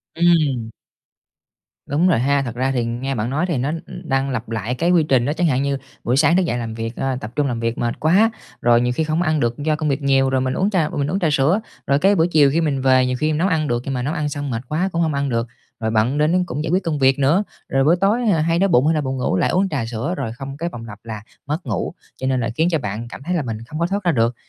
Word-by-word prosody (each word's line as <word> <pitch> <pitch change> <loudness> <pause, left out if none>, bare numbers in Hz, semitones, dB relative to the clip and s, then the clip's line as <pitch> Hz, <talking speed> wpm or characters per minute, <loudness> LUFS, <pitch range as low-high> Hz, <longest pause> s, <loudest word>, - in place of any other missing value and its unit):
Ừm. 155 -9 +2 1.2
Đúng 155 +6 +1
rồi 170 - +3
ha, 140 +3 +2
thật 120 -2 -5
ra 130 +2 0
thì 125 -3 0
nghe 125 +4 -3
bạn 110 0 -2
nói 150 +6 0
thì 170 -6 -1
nó 135 +4 -1 0.2
đang 135 0 -2
lặp 120 -3 -4
lại 115 +2 -2
cái 170 +7 +1
quy 170 -3 +4
trình 130 -5 +2
á, 145 - 0
chẳng 170 +2 +1
hạn 135 -3 +1
như 140 -1 0 0.3
buổi 125 +2 +1
sáng 160 +5 +4
thức 190 - +3
dậy 120 - -1
làm 115 -2 -4
việc, 115 +1 -5
ơ, 135 -1 -2
tập 105 +2 -6
trung 145 -1 +1
làm 120 -3 -2
việc 115 0 -2
mệt 120 0 -2
quá, 195 +9 +4 0.3
rồi 120 0 +4
nhiều 125 0 0
khi 160 - +1
không 155 +2 0
ăn 155 -3 +1
được 120 -2 0
do 150 +1 0
công 155 0 -1
việc 140 +1 -1
nhiều, 135 -1 +3
rồi 130 -1 +1
mình 130 0 -1
uống 190 +8 +1
trà 175 -7 +1
mình 145 -2 -2
uống 190 - 0
trà 175 - +1
sữa, 150 +8 +3 0.3
rồi 140 +1 +3
cái 195 +4 +4
buổi 165 -2 +3
chiều 150 -5 +4
khi 165 +4 +1
mình 140 -4 0
về 130 -1 +4
nhiều 125 0 -1
khi 155 - +1
mình 150 - 0
nấu 180 - +2
ăn 160 -5 0
được 120 -1 0
nhưng 135 - -2
mà 125 - -2
nấu 140 +5 -2
ăn 150 -3 -1
xong 145 -1 -4
mệt 115 -1 -2
quá 175 +5 0
cũng 170 - 0
hông 160 -2 +1
ăn 140 0 -1
được, 115 -1 -1 0.3
rồi 110 -1 -1
bận 115 +6 +1
đến 165 +5 +2
cũng 145 -1 -4
giải 160 - -2
quyết 185 +2 +2
công 155 -4 -2
việc 135 +1 +3
nữa, 150 +9 +3 0.3
rồi 135 0 +2
buổi 160 +5 +5
tối, 210 +5 +3
à, 165 - +2
hay 165 +2 +1
đói 195 - +4
bụng 150 -5 +3
hay 160 - +3
là 155 - +1
buồn 135 -1 -3
ngủ 125 - 0
lại - - +2
uống 190 +2 +1
trà 140 -8 -2
sữa 115 +8 -3
rồi 120 -5 -3
không 135 +2 -8
cái 170 +3 -2
vòng 115 -7 -8
lặp 105 -1 -10
là 110 -2 -7 0.2
mất 155 +4 -3
ngủ, 110 -8 -2 0.2
cho 130 - -4
nên 130 -1 +1
là 120 -1 -1
khiến 160 +5 +2
cho 160 - +1
bạn 110 0 -4
cảm 125 - -10
thấy 180 +4 -1
là 170 - +1
mình 115 -5 -4
không 155 - -6
có 170 - +1
thoát 200 +2 -2
ra 175 - +3
được. 120 -3 +1
140 Hz, 305 wpm, -20 LUFS, 125-160 Hz, 1.2 s, buổi